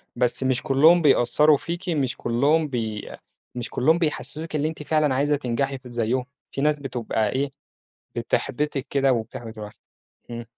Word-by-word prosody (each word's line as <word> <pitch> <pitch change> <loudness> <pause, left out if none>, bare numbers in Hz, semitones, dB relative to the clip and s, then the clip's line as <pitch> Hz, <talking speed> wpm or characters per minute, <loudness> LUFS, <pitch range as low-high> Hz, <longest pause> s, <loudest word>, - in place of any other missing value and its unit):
بس 125 +1 +1
مش 130 -1 0
كلُّهم 155 +5 +5
بيأثّروا 145 +1 +4
فيكِ، 175 +4 -5
مش 140 -6 0
كلُّهم 145 +7 +2
بي 110 -5 -4 0.5
مش 120 -1 -4
كلُّهم 160 +7 +3
بيحسِّسوكِ 155 0 -3
اللي 150 +1 +1
أنتِ 155 -1 -6
فعلًا 150 -3 +2
عايزة 145 +2 +2
تنجحي 135 +1 -2
كده 125 -2 -13
زيُّهم، 120 +2 0 0.3
في 140 - -4
ناس 150 0 +2
بتبقى 115 -5 -2
إيه، 140 +1 -1 0.6
بتحبِّطِك 145 0 -1
كده 135 -2 +3
وبتحبِّط 115 -1 -5
الواحد. 105 -1 -8 0.6
اهم. 120 0 -6
135 Hz, 155 wpm, -24 LUFS, 120-150 Hz, 0.6 s, كلُّهم